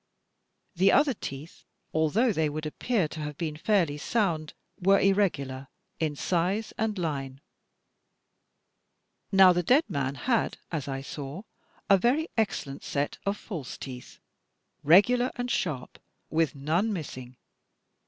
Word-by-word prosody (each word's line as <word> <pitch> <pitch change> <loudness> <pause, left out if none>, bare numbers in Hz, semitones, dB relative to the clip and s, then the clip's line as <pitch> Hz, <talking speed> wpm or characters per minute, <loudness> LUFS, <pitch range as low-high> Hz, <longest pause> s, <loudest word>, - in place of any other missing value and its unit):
The 190 +3 +4
other 285 -2 +4
teeth, 145 - -8 0.3
although 195 - +2
they 160 -3 +1
would 155 +1 -5
appear 190 +4 0
to 160 - -8
have 150 -1 -5
been 160 -3 -3
fairly 165 -4 +1
soimd, 165 -6 0 0.3
were 195 +2 +4
irregular 140 -10 +1 0.3
in 155 -3 -1
size 185 +8 -1
and 220 -2 -1
line. 135 -6 -3 1.9
Now, 190 -2 +7
the 175 - +1
dead 255 - +4
man 140 -1 -2
had, 235 - 0
as 150 -5 -3
I 135 -1 -3
saw, 140 +5 -7 0.4
a 195 -2 +6
very 275 - +2
excellent 145 -11 -2
set 145 0 -2
of 200 +1 0
false 165 - -7
teeth, 125 -2 -9 0.7
regular 240 - +5
and 245 0 -3
sharp, 140 -8 -2 0.3
with 160 -3 +1
none 165 +10 0
missing. 130 -9 -6
165 Hz, 130 wpm, -28 LUFS, 145-205 Hz, 1.9 s, Now